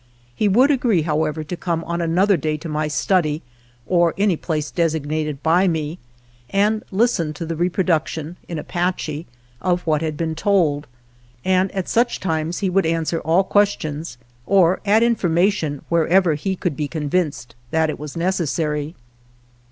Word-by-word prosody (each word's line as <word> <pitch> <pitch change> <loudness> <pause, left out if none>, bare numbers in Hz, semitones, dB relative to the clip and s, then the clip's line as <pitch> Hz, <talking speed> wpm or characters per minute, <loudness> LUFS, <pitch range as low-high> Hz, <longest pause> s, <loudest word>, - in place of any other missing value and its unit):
He 210 - +1
would 250 +9 +5
agree, 235 - +2
however, 155 0 -1
to 160 +4 -5
come 170 -1 -2
on 170 +1 -3
another 180 +5 +3
day 155 -1 -1
to 165 - -8
my 155 0 -1
study, 155 0 +1 0.4
or 175 -2 +2
any 200 -2 +3
place 155 -2 -3
designated 155 -3 -1
by 175 +4 +4
me, 160 -1 -2 0.5
and 210 +2 +1
listen 190 -7 +1
to 170 - -5
the 165 0 -3
reproduction 170 -2 0
(in 170 - -4
Apache) 170 -1 -2 0.3
of 180 +3 0
what 155 -2 +1
had 155 -2 -2
been 160 0 -1
told, 160 -5 +1 0.6
and 185 0 +2
at 190 -2 -3
such 240 +1 +1
times 165 +1 -2
would 190 -2 +2
answer 165 0 0
all 165 +5 +2
questions 165 -9 0 0.3
or 185 -2 +4
add 215 +3 +5
information 175 - +1
wherever 170 +1 +3
he 190 +6 -2
could 175 -4 -2
be 150 0 -2
convinced 150 -5 -2 0.2
that 160 +1 +1
it - - -8
was 150 +2 -7
necessary. 160 -3 -1
165 Hz, 150 wpm, -21 LUFS, 155-185 Hz, 0.6 s, would